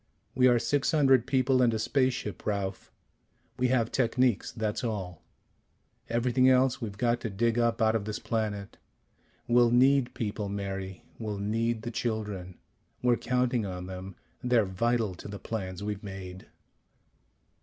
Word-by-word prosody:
We 130 Hz, 0 st, +4 dB
are 120 Hz, -1 st, +5 dB
six 140 Hz, +4 st, +1 dB
hundred 135 Hz, -5 st, +4 dB
people 130 Hz, -1 st, +3 dB
and 120 Hz, -2 st, +4 dB
a -, -, 0 dB
spaceship, 125 Hz, -, -1 dB
Ralph. 100 Hz, -2 st, -3 dB, 0.7 s
We 125 Hz, -, +3 dB
have 120 Hz, -3 st, +1 dB
techniques. 125 Hz, -2 st, +1 dB
That's 110 Hz, 0 st, -3 dB
all. 95 Hz, -7 st, -4 dB, 0.9 s
Everything 125 Hz, +2 st, +3 dB
else 130 Hz, 0 st, +3 dB
we've 105 Hz, -3 st, -5 dB
got 120 Hz, +2 st, +1 dB
to 115 Hz, -, -3 dB
dig 115 Hz, +4 st, +1 dB
up 115 Hz, -1 st, +2 dB
out 110 Hz, 0 st, +3 dB
of 105 Hz, -3 st, -1 dB
this 105 Hz, 0 st, -3 dB
planet. 105 Hz, -3 st, -3 dB, 0.7 s
We'll 120 Hz, 0 st, +5 dB
need 130 Hz, +1 st, +4 dB
people, 105 Hz, -3 st, -3 dB
Mary; 95 Hz, -2 st, -5 dB, 0.2 s
we'll 105 Hz, -3 st, -3 dB
need 110 Hz, +2 st, -1 dB
the 120 Hz, -, -4 dB
children. 105 Hz, -6 st, -3 dB, 0.5 s
We're 125 Hz, -1 st, +4 dB
counting 125 Hz, -1 st, 0 dB
on 90 Hz, -2 st, -5 dB
them. 95 Hz, 0 st, -7 dB, 0.3 s
They're 125 Hz, -3 st, +3 dB
vital 110 Hz, +2 st, 0 dB
to 90 Hz, -, -10 dB
the 100 Hz, 0 st, -6 dB
plans 95 Hz, -4 st, -5 dB
we've 105 Hz, -1 st, -3 dB
made." 95 Hz, -3 st, -8 dB
115 Hz, 150 wpm, -29 LUFS, 100-125 Hz, 0.9 s, are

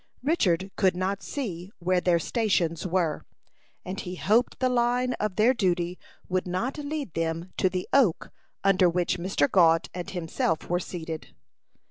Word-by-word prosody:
Richard 195 Hz, -, +1 dB
could 185 Hz, -2 st, +3 dB
not 190 Hz, +2 st, -1 dB
see 190 Hz, -, -5 dB
where 180 Hz, +1 st, +1 dB
their 175 Hz, -2 st, +3 dB
stations 175 Hz, -4 st, 0 dB
were; 170 Hz, -4 st, 0 dB, 0.6 s
and 190 Hz, +2 st, -4 dB
he 180 Hz, -2 st, -5 dB
hoped 220 Hz, +7 st, +2 dB
the 255 Hz, -, +1 dB
line 250 Hz, 0 st, +1 dB
of 210 Hz, -3 st, -1 dB
their 225 Hz, +4 st, +4 dB
duty 180 Hz, -5 st, 0 dB, 0.3 s
would 185 Hz, 0 st, -1 dB
not 225 Hz, +11 st, -2 dB
lead 290 Hz, -, -4 dB
them 165 Hz, +2 st, -3 dB
to 185 Hz, -, +3 dB
the 180 Hz, 0 st, -3 dB
oak 245 Hz, -12 st, +3 dB, 0.3 s
under 190 Hz, -2 st, +4 dB
which 175 Hz, +1 st, 0 dB
Mr. 170 Hz, -5 st, +1 dB
Gault 165 Hz, -2 st, +4 dB
and 180 Hz, -1 st, -5 dB
himself 165 Hz, -2 st, -2 dB
were 175 Hz, 0 st, +1 dB
seated. 165 Hz, -3 st, -7 dB
185 Hz, 155 wpm, -27 LUFS, 170-215 Hz, 0.6 s, their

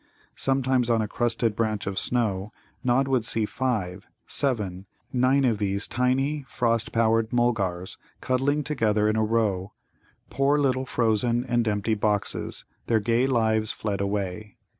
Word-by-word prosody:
Sometimes 130 Hz, -2 st, +1 dB
on 115 Hz, -2 st, +2 dB
a -, -, -3 dB
crusted 115 Hz, 0 st, 0 dB
branch 110 Hz, -2 st, -1 dB
of 100 Hz, -1 st, -1 dB
snow 105 Hz, -5 st, -1 dB, 0.3 s
Nod 130 Hz, +2 st, +2 dB
would 130 Hz, -4 st, +1 dB
see 110 Hz, -1 st, +1 dB
five 105 Hz, -7 st, -3 dB, 0.2 s
seven 100 Hz, -9 st, 0 dB, 0.3 s
nine 130 Hz, +2 st, +3 dB
of 115 Hz, -5 st, +1 dB
these 100 Hz, 0 st, -1 dB
tiny, 135 Hz, +4 st, 0 dB
frost 115 Hz, -2 st, 0 dB
powdered 115 Hz, -1 st, +2 dB
Mulgars 100 Hz, -7 st, -1 dB, 0.2 s
cuddling 140 Hz, +4 st, 0 dB
together 110 Hz, -8 st, +1 dB
in 110 Hz, -, +1 dB
a 110 Hz, -, +2 dB
row, 105 Hz, -3 st, 0 dB, 0.6 s
poor 140 Hz, +2 st, +2 dB
little 130 Hz, -2 st, 0 dB
frozen 120 Hz, +1 st, +1 dB
and 120 Hz, -2 st, 0 dB
empty 105 Hz, +1 st, 0 dB
boxes, 105 Hz, -1 st, -2 dB, 0.2 s
their 115 Hz, -1 st, +3 dB
gay 115 Hz, +4 st, +1 dB
lives 110 Hz, -4 st, +2 dB
fled 100 Hz, -2 st, -3 dB
away. 100 Hz, +1 st, -3 dB
115 Hz, 140 wpm, -25 LUFS, 105-125 Hz, 0.6 s, nine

